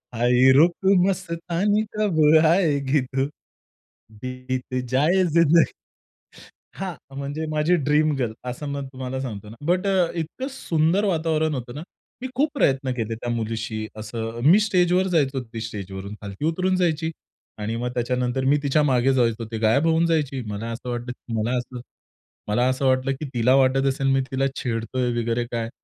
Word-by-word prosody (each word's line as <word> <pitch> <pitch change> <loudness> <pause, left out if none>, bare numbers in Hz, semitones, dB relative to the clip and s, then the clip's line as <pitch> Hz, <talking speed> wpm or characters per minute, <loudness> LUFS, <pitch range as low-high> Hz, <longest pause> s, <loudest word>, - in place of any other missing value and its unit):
आई 125 +2 +4
रुत 170 +3 +6 0.3
मस्तानी 185 +3 0
कब 200 -7 +1 0.3
आएगी 150 -5 +2
तू 135 0 +2 1.0
बित 130 0 -5 0.2
जाये 165 +8 +3
जिंदगानी. 165 0 +4 1.0
हां, 190 -2 -4 0.2
म्हणजे 145 +3 -4
माझी 155 +4 +2
ड्रीम 150 0 +3
गर्ल 120 -4 -1 0.2
असं 145 +4 -6
मग 140 -1 -4
तुम्हाला 130 0 -4
सांगतो 105 -5 -6
ना, 115 - -11
बट 180 +3 +1
अ, 185 -3 +2
इतकं 170 - -4
सुंदर 170 - +1
वातावरण 160 -3 0
होतं 120 -1 -6
ना, 150 - -6 0.4
मी 260 - -3
खूप 295 +4 +2
प्रयत्न 135 - +1
केले 115 -2 -3
त्या 120 +1 -6
मुलीशी 110 -1 -3
असं 115 +1 -5
मी 205 - +7
स्टेजवर 185 -2 +2
जायचो 135 -3 +1
ती 115 -1 -8
स्टेजवरून 100 -2 -6
खालती 100 +8 -5
उतरून 185 +3 +1
जायची 165 -2 0 0.5
आणि 110 +2 -3
मग 125 +1 -2
त्याच्यानंतर 125 +1 -1
मी 145 +2 +4
तिच्या 145 +2 +2
मागे 135 -1 +3
जायचो 115 -2 +1
ती 110 - -3
गायब 135 +9 +3
होऊन 165 +1 +3
जायची. 145 -5 0
मला 105 +3 -4
असं 125 +2 -6
वाटलं 120 0 -4 0.3
मला 120 +4 0
असं 125 0 -6 0.7
मला 120 +4 +2
असं 130 +1 -1
वाटलं 130 +1 +2
की 155 - -4
तिला 125 +2 +3
वाटत 135 0 +3
असेल 135 0 0
मी 135 - +2
तिला 135 +1 +1
छेडतोय 120 +1 -2
वगैरे 120 +1 -1
काय 115 -1 -2
135 Hz, 160 wpm, -23 LUFS, 120-165 Hz, 1.0 s, मी